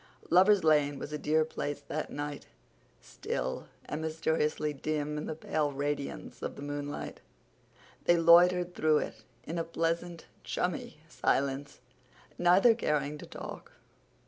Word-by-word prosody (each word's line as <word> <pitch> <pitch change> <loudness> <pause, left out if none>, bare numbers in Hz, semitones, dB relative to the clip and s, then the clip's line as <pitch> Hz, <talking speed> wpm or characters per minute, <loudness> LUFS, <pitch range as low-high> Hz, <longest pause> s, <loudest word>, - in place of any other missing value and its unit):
Lover's 190 +3 +6
Lane 150 -2 +3
was 150 - -6
a 150 - -3
dear 155 +2 +2
place 145 -2 -4
that 155 +2 -4
night, 145 0 -5 0.6
still 65 - -4 0.2
and 150 - -4
mysteriously 155 -1 0
dim 150 +1 -2
in 150 - -4
the - - -3
pale 150 -1 -1
radiance 140 0 -4
of - - -4
the 140 - -8
moonlight. 145 0 -5 0.8
They 175 - +5
loitered 175 +1 +6
through 155 -2 +3
it 110 - -4 0.2
in 170 +2 -4
a - - 0
pleasant 165 +1 -2 0.2
chummy - - -2
silence, 140 +1 -1 0.6
neither 185 +7 +6
caring 150 -8 -1
to - - -9
talk. - - -9
155 Hz, 135 wpm, -31 LUFS, 145-165 Hz, 0.8 s, Lover's